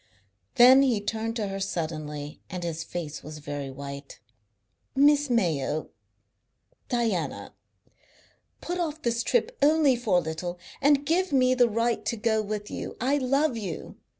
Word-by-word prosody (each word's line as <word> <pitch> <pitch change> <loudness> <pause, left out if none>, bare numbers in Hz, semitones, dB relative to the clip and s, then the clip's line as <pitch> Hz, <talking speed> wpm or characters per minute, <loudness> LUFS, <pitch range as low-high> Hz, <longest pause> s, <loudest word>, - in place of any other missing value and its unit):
Then 255 +3 +8
he 250 -6 +2
turned 220 +2 -3
to 215 -3 -1
her 195 0 -4
suddenly, 155 -5 -4
and 180 -2 -5
his 165 -1 -3
face 160 -4 -6
was 155 0 -9
very 145 -2 -5
white. 140 +1 -8 0.8
"Miss 290 +1 +4
Mayo 155 - 0 1.0
Diana 230 - -1 1.1
put 355 +1 -3
off 315 -2 -3
this 235 -1 +1
trip 485 - 0
only 295 -2 +5
for 225 -7 +1
a - - +3
little, 175 +2 -4 0.2
and 285 0 +4
give 355 +3 +1
me 255 -2 +4
the 245 -2 +4
right 230 +2 0
to 235 - -1
go 220 0 +1
with 210 0 -5
you. - - -6
I 275 +4 +1
love 275 +1 +1
you. 195 -8 -6
225 Hz, 150 wpm, -27 LUFS, 165-270 Hz, 1.1 s, Then